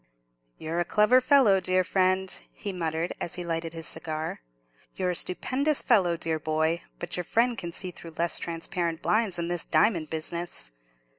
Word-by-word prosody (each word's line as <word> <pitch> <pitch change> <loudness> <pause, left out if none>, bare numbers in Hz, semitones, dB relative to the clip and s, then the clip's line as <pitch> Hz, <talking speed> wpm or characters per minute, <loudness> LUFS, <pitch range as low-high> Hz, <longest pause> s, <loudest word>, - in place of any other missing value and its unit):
"You're 165 +2 -3
a - - +2
clever 215 +7 +4
fellow, 255 -7 +5
dear 185 0 +1
friend," 185 0 +1
he 200 -2 -5
muttered, 165 -1 -2
as 170 - -3
he 180 - -5
lighted 165 -1 -3
his 165 -1 -3
cigar; 155 - -2 0.5
"you're 185 -1 0
a - - -3
stupendous 275 - +1
fellow, 185 -8 +3
dear 160 -1 -2
boy; 160 +2 0 0.2
but 175 - -4
your 180 - -2
friend 235 +7 +1
can 170 -6 -6
see 185 +1 0
through 165 -2 -11
less 170 0 +2
transparent 170 0 -3
blinds 215 -4 +2
than 170 -1 0
this 175 -1 -1
diamond 170 -8 +2
business. 160 - -5
175 Hz, 170 wpm, -27 LUFS, 165-195 Hz, 0.5 s, fellow